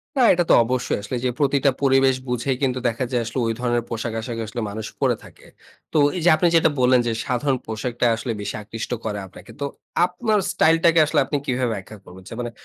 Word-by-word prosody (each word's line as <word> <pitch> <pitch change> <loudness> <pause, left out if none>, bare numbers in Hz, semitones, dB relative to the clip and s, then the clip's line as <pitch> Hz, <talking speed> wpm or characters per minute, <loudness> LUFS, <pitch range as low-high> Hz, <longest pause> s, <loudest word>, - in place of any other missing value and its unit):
না, 265 - +2
এটা 175 0 +2
তো - - +7
অবশ্যই 125 +2 -1
আসলে 105 +5 -4
যে - - +2
প্রতিটা 140 -1 +3
পরিবেশ 135 -1 +4
বুঝেই 125 +2 -1
কিন্তু 130 -1 +1
দেখা 120 +2 -1
যায় 120 -2 +1
আসলে 115 +3 -3
ঐ - - 0
ধরনের 120 -1 0
পোশাক-আশাক 115 0 -4
আসলে 115 +2 -5
মানুষ 110 +1 -5
পরে - - +3
থাকে। - - -16 0.5
তো - - +2 0.2
এইযে 175 0 +3
আপনি 175 +3 +2
যেটা 160 -1 +5
বললেন 125 0 +5
যে - - +1
সাধারণ 130 +1 0
পোশাকটা 120 +2 -2
আসলে 115 +2 -4
বেশি - - -4
আকৃষ্ট 115 +3 -6
করে 105 -2 -2
আপনাকে। 95 - -14
তো 140 - -1 0.4
আপনার 210 +4 0
স্টাইলটাকে 165 +1 +4
আসলে - - +1
আপনি 145 +2 -1
কিভাবে 125 -2 0
ব্যাখ্যা 100 +2 -9
করবেন? 95 +1 -13 0.2
মানে 120 - -4
125 Hz, 200 wpm, -22 LUFS, 115-140 Hz, 0.5 s, তো